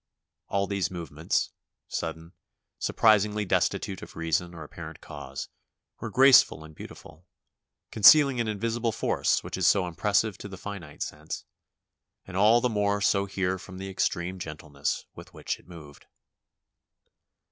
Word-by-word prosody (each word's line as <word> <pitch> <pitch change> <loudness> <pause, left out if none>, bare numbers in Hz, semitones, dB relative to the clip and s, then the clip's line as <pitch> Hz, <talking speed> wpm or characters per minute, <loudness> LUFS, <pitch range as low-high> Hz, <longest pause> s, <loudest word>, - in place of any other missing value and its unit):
All 100 0 0
these 100 -2 -1
movements, 85 -5 -2 0.4
sudden, 80 +1 -5 0.5
surprisingly 105 -1 +3
destitute 95 0 0
of - - -11
reason 85 +1 -1
or 80 - -8
apparent 75 - -9
cause, 65 +1 -8 0.5
were - - -5
graceful 130 -10 +6
and 80 0 -12
beautiful, 80 +3 -12 0.6
concealing 135 +4 +7
an 115 - -2
invisible 115 +2 -1
force - - 0
which - - -5
is 95 -2 +2
so 95 -3 +4
impressive 100 +4 0
to - - -7
the 95 -2 -9
finite 90 -7 -6
sense, 75 +1 -7 0.8
and 95 - -10
all 110 +5 +5
the 125 - +2
more 105 -3 0
so 100 0 +2
here 95 -1 -1
from 95 +1 -11
the 95 +1 -6
extreme 90 0 -1
gentleness 75 -3 -4
with - - -13
which - - -4
it - - -23
moved. 75 -5 -13
95 Hz, 140 wpm, -27 LUFS, 80-105 Hz, 0.8 s, concealing